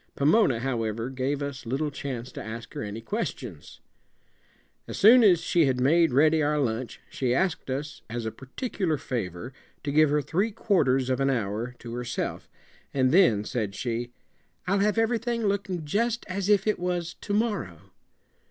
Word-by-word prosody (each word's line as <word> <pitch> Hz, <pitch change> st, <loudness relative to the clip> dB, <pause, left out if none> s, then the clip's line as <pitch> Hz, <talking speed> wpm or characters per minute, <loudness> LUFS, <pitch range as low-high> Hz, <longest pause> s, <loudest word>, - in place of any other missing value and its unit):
Pomona, 140 Hz, -, +3 dB
however, 115 Hz, -2 st, -2 dB
gave 135 Hz, +2 st, -2 dB
us 140 Hz, -1 st, -5 dB
little 145 Hz, +5 st, -1 dB
chance 130 Hz, -3 st, -5 dB
to -, -, -7 dB
ask 115 Hz, +1 st, -7 dB
her -, -, -5 dB
any 105 Hz, +2 st, -5 dB
questions. 125 Hz, -, -5 dB, 1.1 s
As -, -, -6 dB
soon 235 Hz, +4 st, +8 dB
as 180 Hz, -6 st, +5 dB
she 165 Hz, -4 st, +3 dB
had 130 Hz, -1 st, 0 dB
made 160 Hz, +4 st, +4 dB
ready 155 Hz, +4 st, +4 dB
our 150 Hz, 0 st, +1 dB
lunch 120 Hz, -3 st, -2 dB
she 125 Hz, -2 st, -1 dB
asked 175 Hz, -2 st, 0 dB
us 145 Hz, +4 st, -4 dB
as 120 Hz, 0 st, -4 dB
a 110 Hz, -, -2 dB
particular 160 Hz, -, -3 dB
favor 115 Hz, -2 st, -4 dB, 0.3 s
to 140 Hz, -, -2 dB
give 155 Hz, +1 st, +5 dB
her 150 Hz, 0 st, +1 dB
three 185 Hz, -, 0 dB
quarters 140 Hz, -, +1 dB
of 130 Hz, -, 0 dB
an 135 Hz, 0 st, +2 dB
hour 115 Hz, 0 st, -2 dB
to 115 Hz, -1 st, -9 dB
herself, 125 Hz, 0 st, -4 dB, 0.4 s
and 130 Hz, -2 st, +2 dB
then, 140 Hz, -, +5 dB
said 105 Hz, -4 st, -3 dB
she, 120 Hz, 0 st, -3 dB, 0.6 s
"I'll 195 Hz, +2 st, +1 dB
have 210 Hz, +2 st, +2 dB
everything 230 Hz, 0 st, 0 dB
looking 195 Hz, -5 st, -1 dB
just 230 Hz, +8 st, 0 dB
as 195 Hz, 0 st, -2 dB
if 205 Hz, -2 st, +4 dB
it 215 Hz, -3 st, +1 dB
was 175 Hz, -1 st, -2 dB
to 205 Hz, -, -3 dB
morrow." 205 Hz, -, -2 dB
140 Hz, 170 wpm, -27 LUFS, 120-190 Hz, 1.1 s, soon